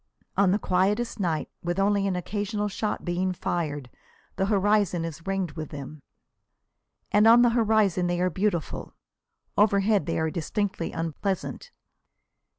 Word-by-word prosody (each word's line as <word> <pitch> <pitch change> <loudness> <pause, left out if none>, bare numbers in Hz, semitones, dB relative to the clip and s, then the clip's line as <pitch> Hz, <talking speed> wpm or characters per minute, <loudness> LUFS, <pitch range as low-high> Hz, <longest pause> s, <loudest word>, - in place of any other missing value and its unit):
On 195 -1 +4
the 195 - +3
quietest 210 +5 0
night, 165 -5 -1
with 175 +1 -2
only 200 0 +2
an 190 - 0
occasional 205 +3 -2
shot 210 +1 -3
being 180 +1 0
fired, 150 -6 -3 0.5
the 195 - 0
horizon 200 -4 +2
is 165 +1 -8
ringed 195 -4 -1
with 155 -2 -6
them. 145 +1 -8 1.1
And 210 +2 +5
on 235 +2 +8
the 240 - +4
horizon 215 -6 +2
they 175 0 -1
are 180 0 +1
beautiful. 185 -3 -2 0.6
Overhead 200 -3 +3
they - - -1
are 160 0 0
distinctly 180 +1 -2
unpleasant. 170 - -3
190 Hz, 140 wpm, -26 LUFS, 170-205 Hz, 1.1 s, on